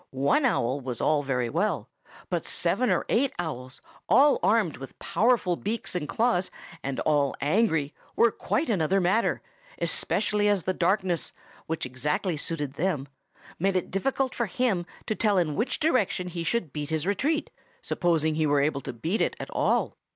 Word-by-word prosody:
One 140 - +2
owl 135 - +1
was 125 -3 -4
all 150 -1 +2
very 125 -4 -1
well; 210 - -1 0.4
but - - 0
seven 255 - +1
or - - +1
eight 265 +3 +2
owls, 130 -7 -5 0.3
all 275 +9 +6
armed 210 -8 +2
with 135 0 -10
powerful 225 -6 +2
beaks 220 +6 -3
and 165 -5 -3
claws, 220 -6 +1 0.3
and 135 -1 -3
all 145 -2 +2
angry, 160 -3 +1 0.2
were 235 - +5
quite 310 - -1
another 195 -3 +2
matter, 195 +6 +1 0.3
especially 210 -1 +1
as 205 -4 +2
the 185 - 0
darkness, 185 -1 0 0.3
which 160 0 -2
exactly 150 +8 -1
suited 145 -2 -2
them, 150 -6 -1 0.5
made 195 +2 +1
it 185 - -1
difficult 260 +6 0
for 235 - -1
him 195 -5 0 0.2
to - - 0
tell 210 -2 +2
in 165 -4 +1
which 225 +5 -1
direction 215 - +1
he 170 -1 -4
should 175 - -1
beat 150 -1 -4
his 160 0 -1
retreat, 280 - 0 0.3
supposing 160 -3 +1
he 155 0 +1
were 145 0 +3
able 140 -1 0
to - - -6
beat 160 - -2
it - - +1
at - - -7
all. - - +1
175 Hz, 170 wpm, -27 LUFS, 150-215 Hz, 0.5 s, all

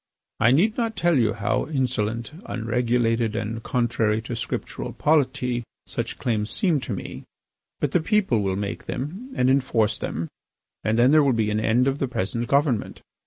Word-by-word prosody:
I 120 - +5
need 185 - +3
not 230 -2 -1
tell 175 -3 +2
you 115 -5 +3
how 105 -3 -1
insolent, 120 -5 -1 0.2
unregulated, 115 -1 0
and 115 0 -3
contrary 115 -3 +1
to 120 - -4
Scriptural 115 - -4
polity 130 -5 +1 0.2
such - - -4
claims 110 -3 -1
seem 170 - +1
to 130 - -6
me. 95 - -6 0.6
But 145 - 0
the 175 - +2
people 190 - +2
will 95 -1 0
make 100 0 -4
them, 185 - -5
and 125 - +2
enforce 130 -5 +2
them, 85 - -3 0.6
and 110 +1 +1
then 125 +3 +5
there 155 0 +6
will 140 -3 +3
be 110 -2 +1
an 105 - +1
end 120 +4 +2
of 135 +1 0
the 135 - 0
present 120 0 -2
government. 140 -5 +1
120 Hz, 170 wpm, -24 LUFS, 110-140 Hz, 0.6 s, there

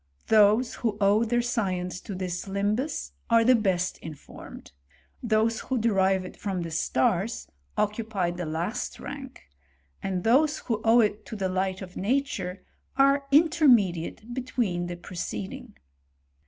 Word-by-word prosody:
Those 220 +3 +5
who 220 -4 0
owe 205 +2 +4
their 240 +1 +1
science 185 -7 -2
to 200 - -7
this 180 -1 -4
limhus^ 205 +9 -2 0.2
are 230 -1 +5
the 255 +3 +6
best 190 -6 0
informed; 155 -3 -11 0.5
those 225 -1 +1
who 260 - -2
derive 195 -4 +2
it - - -9
from 190 -4 -3
the 165 - -6
stars, 175 - 0 0.3
occupy 210 -4 -1
the 175 -1 -5
last 170 +10 -3
rank; 270 -2 -8 0.6
and 185 -2 -2
those 295 +7 +3
who 225 -3 -3
owe 230 +1 +6
it 210 -1 0
to 225 - -6
the 190 -3 -1
light 190 +1 -1
of 180 -1 -10
nature, 200 -5 -2 0.3
are 275 +1 +4
intermediate 245 - +3
between 235 -9 -2
the 175 0 -5
pre 175 +1 -11
ceding. 105 - -5
210 Hz, 140 wpm, -27 LUFS, 185-240 Hz, 0.6 s, the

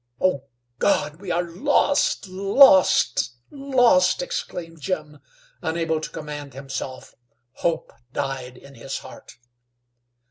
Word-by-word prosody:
"Oh, 160 -8 +1 0.3
God! 150 +1 +1
We 195 - -7
are 175 0 +1
lost! 185 +8 +1
Lost! 190 - +5 0.2
Lost!" 275 - +3
exclaimed 170 - -6
Jim, 150 -4 -4 0.4
unable 160 -1 -1
to - - -5
command 145 -2 -7
himself. 135 -1 -6 0.4
Hope 165 -2 -2 0.2
died 130 -2 -4
in 140 +2 -15
his 135 0 -6
heart. 130 - -12
165 Hz, 105 wpm, -23 LUFS, 140-190 Hz, 0.4 s, Lost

